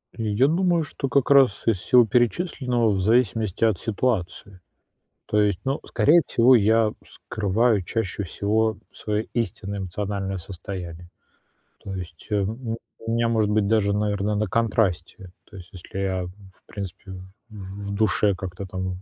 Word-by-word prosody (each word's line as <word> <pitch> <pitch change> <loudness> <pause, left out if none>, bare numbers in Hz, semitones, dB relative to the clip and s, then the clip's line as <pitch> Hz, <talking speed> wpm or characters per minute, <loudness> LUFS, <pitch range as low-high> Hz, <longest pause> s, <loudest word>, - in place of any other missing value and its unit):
Я 115 +3 +1
думаю, 170 +1 +2
что 135 -2 -4
как 140 +1 +2
раз 135 -7 +5
из 110 -5 +2
всего 125 +4 +5
перечисленного, 120 - +1
в 95 -2 0
зависимости 110 -1 +1
от 110 -6 +3
ситуации. 100 -4 -2 0.7
То 105 - 0
есть, 100 -3 0
ну, 135 +2 -1
скорее 170 +3 +4
всего, 125 +2 +5
я 110 0 +3
скрываю 110 +1 0
чаще 100 +1 -3
всего 110 +4 0
свое 105 0 -3
истинное 100 -3 -3
эмоциональное 95 +1 -3
состояние. 90 -1 -8 0.7
То 100 - -7
есть, 90 -4 -8
эм, 105 -1 +2
м, 115 0 -5 0.3
у 115 - -2
меня, 115 0 +1
может 110 -2 +1
быть, 105 -1 +2
даже, 100 -1 +2
наверно, 105 0 0
на 105 0 0
контрасте. 95 -4 -1 0.2
То 105 - -12
есть 90 -1 -12
если 95 +1 -9
я, 95 -2 -1
в 95 0 -16
принципе, 100 0 -8
в 95 - -8 0.3
в 100 -1 -8
в - - -3
душе 105 -1 +2
как-то 95 +1 -6
там 95 0 -4
105 Hz, 155 wpm, -24 LUFS, 95-115 Hz, 0.7 s, раз